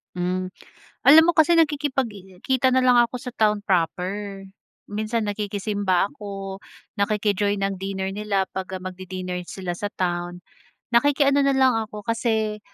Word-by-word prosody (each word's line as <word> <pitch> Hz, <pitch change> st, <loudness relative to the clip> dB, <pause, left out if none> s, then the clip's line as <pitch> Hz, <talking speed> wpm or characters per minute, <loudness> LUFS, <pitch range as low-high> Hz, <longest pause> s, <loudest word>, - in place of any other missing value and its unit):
Hmm, 180 Hz, +1 st, -1 dB, 0.5 s
alam 315 Hz, +3 st, +8 dB
mo 345 Hz, -, +3 dB
kasi 335 Hz, +1 st, +4 dB
nakikipagkita 260 Hz, -, 0 dB
na 260 Hz, 0 st, +2 dB
lang 250 Hz, -1 st, +5 dB
ako 240 Hz, +1 st, +2 dB
sa 250 Hz, +1 st, -7 dB
town 210 Hz, -2 st, +1 dB
proper. 195 Hz, +3 st, -1 dB, 0.5 s
Minsan 215 Hz, +2 st, -1 dB
nakikisimba 205 Hz, -2 st, -1 dB
ako, 195 Hz, -5 st, -7 dB, 0.4 s
nakiki-join 205 Hz, -1 st, +1 dB
ng 195 Hz, -1 st, -2 dB
dinner 190 Hz, 0 st, -3 dB
nila 200 Hz, -1 st, -1 dB
'pag, 190 Hz, -1 st, -4 dB
ah, -, -, -14 dB
magdi-dinner 185 Hz, -1 st, -5 dB
sila 185 Hz, -2 st, -5 dB
sa 205 Hz, +4 st, -4 dB
town. 175 Hz, 0 st, -3 dB, 0.5 s
Nakiki-ano 280 Hz, +2 st, +4 dB
na 275 Hz, 0 st, +3 dB
lang 260 Hz, -2 st, +4 dB
ako 215 Hz, -1 st, -4 dB
kasi, 220 Hz, -2 st, 0 dB
205 Hz, 135 wpm, -23 LUFS, 190-240 Hz, 0.5 s, alam